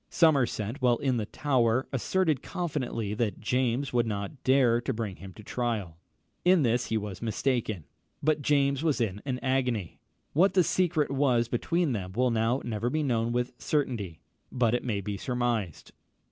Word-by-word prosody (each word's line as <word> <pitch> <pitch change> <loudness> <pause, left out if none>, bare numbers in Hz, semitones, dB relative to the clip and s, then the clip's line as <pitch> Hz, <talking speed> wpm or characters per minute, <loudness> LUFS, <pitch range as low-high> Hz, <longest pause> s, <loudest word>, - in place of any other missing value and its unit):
Somerset, 135 - +2
while 125 -2 +4
in 130 -2 0
the 105 -2 -2
Tower, 130 -3 +1
asserted 155 +2 +1
confidently 130 - -3
that 110 -1 -1
James 125 +4 0
would 120 -1 +2
not 105 +5 -4
dare 130 -3 +4
to 125 - -2
bring 110 -4 -4
him 95 0 -10
to 105 - -12
trial. 110 -8 -2 0.5
In 180 -3 +5
this 120 0 +1
he 110 - 0
was 105 -3 -5
mistaken; 115 - -1 0.4
but 155 0 +2
James 140 -1 +2
was 155 -5 +1
in 105 -4 -1
an 130 -2 -1
agony. 125 -8 -1 0.3
What 185 +5 +4
the 185 - +6
secret 155 -4 +1
was 130 -4 +2
between 165 +7 0
them 95 -5 -4
will 125 +3 +2
now 115 +3 +1
never 115 0 -1
be 155 +4 0
known 120 -4 0
with 125 +1 -1
certainty; 115 - -2 0.3
but 120 -3 +2
it 120 - 0
may 105 -5 -1
be 100 +1 -4
surmised. 120 - -2
120 Hz, 170 wpm, -28 LUFS, 110-140 Hz, 0.5 s, the